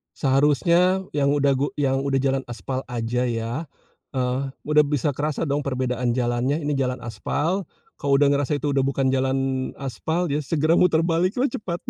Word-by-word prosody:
Seharusnya 170 +7 +3
yang 140 -1 +1
udah 140 -1 +3
gu 145 - +1
yang 135 -2 +1
udah 140 0 -1
jalan 135 0 +1
aspal 120 +3 -4
aja 125 0 -1
ya, 120 +7 -3 0.5
eee, 130 +1 0 0.2
udah 150 0 +4
bisa 145 0 0
kerasa 150 +3 -2
dong 145 -1 0
perbedaan 125 -3 -1
jalannya 120 +2 0
ini 145 - -1
jalan 130 -3 -1
aspal, 155 - -2 0.3
kalau 140 -1 +2
udah 140 0 +4
ngerasa 145 0 +1
itu 145 0 -1
udah 140 - +1
bukan 135 0 +1
jalan 130 0 +1 0.4
aspal 155 +6 -2
ya 145 - +1
segera 155 +3 +1
muter 165 -3 +4
baliklah 185 +10 +1
cepat 175 -4 -5
140 Hz, 165 wpm, -23 LUFS, 130-150 Hz, 0.5 s, udah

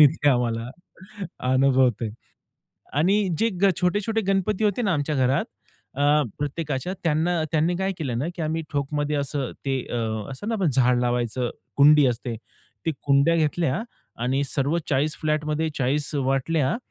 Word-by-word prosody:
इथे 145 0 +5
आम्हाला 120 -2 0 0.8
अनुभवतोय. 130 -4 +3 0.8
आणि 190 +7 +2
जे 230 - +3
ग 195 - +6
छोटे-छोटे 205 +5 +1
गणपती 195 +2 +1
होते 210 +3 +1
ना 200 -4 +1
आमच्या 150 +1 -1
घरात, 130 +1 +2 0.5
आह, 145 +1 +4 0.2
प्रत्येकाच्या 145 +3 -3
त्यांना 165 +1 +1
त्यांनी 165 +3 +2
काय 190 +1 -1
केलं 125 -7 -2
ना, 140 - -1
की 170 - -5
आम्ही 160 +1 -1
ठोकमध्ये 145 +1 -1
असं 140 -2 -2 0.2
ते, 135 -1 0
अ, 110 -1 -2
असंत 205 - -4
ना 195 - 0
झाड 125 -1 +3
लावायचं, 120 0 -1 0.3
कुंडी 145 0 +7
असते. 120 -1 -2 0.5
ती 160 - +2
कुंड्या 140 +4 +3
घेतल्या 155 +1 0 0.4
आणि 135 +3 +1
सर्व 140 +4 0
40 145 +2 +1
फ्लॅटमध्ये 155 0 0
40 140 +3 0
वाटल्या, 135 +1 +1
145 Hz, 140 wpm, -24 LUFS, 130-165 Hz, 0.8 s, कुंडी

